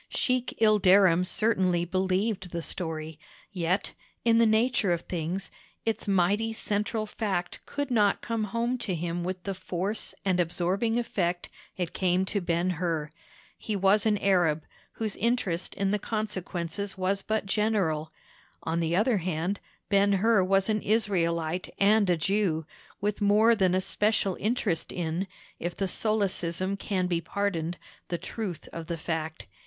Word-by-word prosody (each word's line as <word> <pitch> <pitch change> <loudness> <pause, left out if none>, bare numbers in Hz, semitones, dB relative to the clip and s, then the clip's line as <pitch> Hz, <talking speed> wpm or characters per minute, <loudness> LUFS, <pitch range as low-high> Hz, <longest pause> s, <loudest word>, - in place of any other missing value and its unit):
Sheik 255 -1 0
Ilderim 195 -5 +5
certainly 185 -3 +2
believed 190 +2 0
the 170 -1 -4
story; 160 -3 -4 0.3
yet, 185 +1 -1 0.3
in 230 -1 +5
the 230 - +6
nature 220 -2 +2
of 170 -1 +1
things, 175 +3 -4 0.3
its 225 -1 -1
mighty 200 +4 +2
central 215 +1 -1
fact 200 -4 -3
could 285 -2 -3
not 210 -4 +3
come 230 -2 -1
home 235 +4 -1
to 195 -6 -2
him 170 +1 -2
with 185 0 -4
the 195 - -2
force 190 +3 -4
and 185 -2 +2
absorbing 185 +7 +1
effect 180 -7 -1 0.3
it 180 -3 -2
came 185 0 +2
to 200 +1 -1
Ben 175 +1 +1
Hur. 160 -4 -1 0.5
He 215 - -3
was 200 +2 +4
an 210 -1 +3
Arab, 175 -6 +2 0.3
whose 220 -2 -3
interest 200 -7 -1
in 195 0 0
the 210 - +1
consequences 195 -3 -3
was 190 +1 0
but 220 0 -1
general; 195 -7 0 0.5
on 165 +1 -1
the 165 0 +1
other 215 +4 +3
hand, 180 +2 -2 0.3
Ben 200 0 +4
Hur 205 0 +4
was 195 +1 +2
an 215 -1 +1
Israelite 175 -6 0
and 205 0 +4
a 175 - +3
Jew, 170 -2 0 0.4
with 210 +1 -1
more 210 +3 +5
than 190 -4 +2
a 185 - +2
special 205 -1 +1
interest 210 -6 -1
in—if 175 +1 -4
the 195 - 0
solecism 190 -3 0
can 195 -2 -1
be 170 -2 0
pardoned—the 175 -1 -3
truth 180 -1 -5
of 165 -1 -6
the 170 - -3
fact. 160 -1 -4
190 Hz, 150 wpm, -28 LUFS, 175-210 Hz, 0.5 s, the